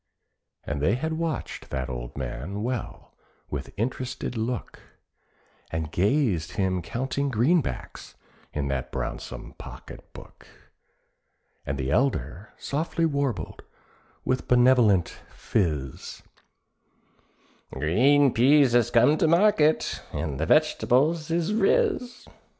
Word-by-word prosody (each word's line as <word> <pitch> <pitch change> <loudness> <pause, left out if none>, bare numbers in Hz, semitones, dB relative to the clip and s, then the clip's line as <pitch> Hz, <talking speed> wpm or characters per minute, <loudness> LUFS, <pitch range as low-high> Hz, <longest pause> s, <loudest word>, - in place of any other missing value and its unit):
And 70 -1 -4
they 95 +9 +2
had 160 +5 -2
watched 160 -1 -4
that 65 -1 -3
old - - -7
man 90 - -5
well 125 -1 -5 0.4
with 70 -2 -5
interested 125 +2 -3
look, 115 +2 -4 0.9
And 80 -1 -4
gazed 100 - +1
him 95 -3 0
counting 130 - -2
greenbacks 135 +7 -1 0.4
in 70 -2 -2
that 65 -2 -3
brownsome - - -6
pocket - - -11
book; - - -14 1.2
And 70 - -2
the 65 0 -2
elder 95 - -1
softly 165 +3 -1
warbled 140 -7 -2 0.6
with 130 - -1
benevolential 120 -8 +4
phiz, 75 - -3 1.5
"Green 125 - +3
peas 135 +2 +5
has 120 -1 +3
come 125 +6 +4
to 165 - +3
market, 170 -2 +3
and 75 -5 -4
the - - -1
veg'tables 155 +6 +2
is 170 +4 0
riz." 255 - +1
120 Hz, 105 wpm, -26 LUFS, -, 1.5 s, peas